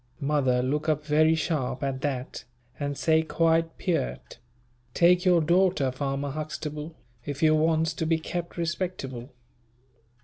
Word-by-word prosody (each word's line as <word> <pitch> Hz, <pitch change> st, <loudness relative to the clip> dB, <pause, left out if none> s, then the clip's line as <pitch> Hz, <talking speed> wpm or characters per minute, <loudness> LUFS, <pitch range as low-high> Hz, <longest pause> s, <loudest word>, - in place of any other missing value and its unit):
Mother 140 Hz, -4 st, +1 dB
look 150 Hz, +4 st, -1 dB
up 150 Hz, -1 st, 0 dB
very 155 Hz, +2 st, +4 dB
sharp 150 Hz, -5 st, -2 dB
at 135 Hz, -1 st, -2 dB
that, 135 Hz, -3 st, -4 dB, 0.3 s
and 145 Hz, -1 st, -3 dB
say 160 Hz, -1 st, +3 dB
quite 165 Hz, 0 st, +1 dB
peart, 65 Hz, -, -3 dB, 0.6 s
"take 180 Hz, +1 st, +4 dB
your 175 Hz, -2 st, +5 dB
daughter, 175 Hz, -4 st, +2 dB
farmer 135 Hz, +1 st, -3 dB
Huxtable, 155 Hz, +1 st, -5 dB, 0.3 s
if 145 Hz, +4 st, -5 dB
you 155 Hz, 0 st, +5 dB
wants 160 Hz, +1 st, +2 dB
to 160 Hz, 0 st, -3 dB
be 165 Hz, 0 st, +2 dB
kept 170 Hz, +2 st, -5 dB
respectable." 165 Hz, -7 st, -4 dB
155 Hz, 135 wpm, -26 LUFS, 140-165 Hz, 0.6 s, your